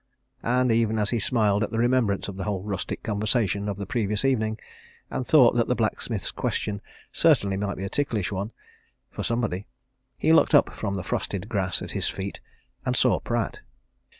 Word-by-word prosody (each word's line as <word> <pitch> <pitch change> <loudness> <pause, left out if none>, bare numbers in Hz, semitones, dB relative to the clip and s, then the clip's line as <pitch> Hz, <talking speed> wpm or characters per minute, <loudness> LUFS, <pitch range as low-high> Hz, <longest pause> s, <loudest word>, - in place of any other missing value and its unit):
And 125 +1 +2
even 115 -1 +2
as 105 -1 +1
he 120 - +1
smiled 105 -1 +2
at - - -2
the 115 - -3
remembrance 120 -4 +2
of 100 - -6
the 95 - -4
whole 100 -3 -2
rustic 100 -2 -4
conversation 105 -1 0
of 100 - -3
the 100 - -4
previous 105 +2 0
evening, 110 -5 +1 0.5
and 130 -1 -3
thought 130 -7 +6
that 120 -1 +2
the 125 - +1
blacksmith's 110 -2 -1
question 100 -1 -2 0.3
certainly 100 -1 +3
might 100 0 -2
be 95 - -5
a - - -2
ticklish 115 -9 -1
one 100 +3 -3 0.6
for - - -5
somebody 110 -5 -1 0.5
he 160 - +3
looked 160 - +5
up 145 - +4
from 100 -2 -3
the 95 - -3
frosted 100 +3 -3
grass 95 -5 -1
at - - -5
his - - -1
feet, 95 +1 -5 0.4
and - - 0
saw - - +3
Pratt. - - -2
105 Hz, 185 wpm, -26 LUFS, 100-120 Hz, 0.6 s, thought